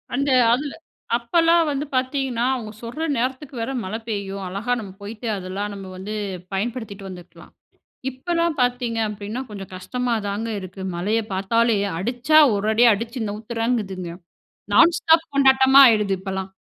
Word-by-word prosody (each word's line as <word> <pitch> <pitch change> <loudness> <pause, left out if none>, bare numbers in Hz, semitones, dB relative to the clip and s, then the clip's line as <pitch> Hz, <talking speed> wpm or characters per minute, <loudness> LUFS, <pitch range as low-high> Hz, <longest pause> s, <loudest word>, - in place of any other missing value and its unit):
அந்த 280 +1 0 0.2
அதுல 280 +3 -2 0.4
அப்பலாம் 330 +7 +3
வந்து 285 +1 -2
பார்த்தீங்கன்னா, 255 -2 0
அவங்க 220 -4 -6
சொல்ற 245 +8 -4
நேரத்துக்கு 260 +3 -3
வேற 230 +4 -2
மழை 190 +4 -4
பெய்யும். 200 -2 -4
அழகா 200 +7 -2
நம்ம 200 -3 -8
போயிட்டு 215 +3 -7
அதெல்லாம் 195 +3 -4
நம்ம 195 -1 -8
வந்து 200 +3 -6 0.4
பயன்படுத்திட்டு 205 -2 -4
வந்துக்கலாம். 180 -1 -12 0.6
இப்பலாம் 335 +3 -1
பார்த்தீங்க 245 -2 0
அப்டின்னா, 210 +4 -5
கொஞ்சம் 195 -2 -8
கஷ்டமா 245 +6 -2
தாங்க 210 +3 -3
இருக்கு. 185 0 -9
மழைய 210 +6 0
பார்த்தாலே 230 +4 +2 0.2
அடிச்சா 250 +9 +3 0.2
ஒரு 205 +2 0
அடி 240 +2 +5
அடிச்சு 230 +4 -4
நவுத்துறேங்குதுங்க 215 -4 -3 0.6
நான் 335 0 +6
ஸ்டாப் 325 0 +3
கொண்டாட்டமா 265 0 +6
ஆயிடுது 210 -4 +3
இப்பலாம். 190 0 -5
230 Hz, 135 wpm, -22 LUFS, 200-260 Hz, 0.6 s, நான்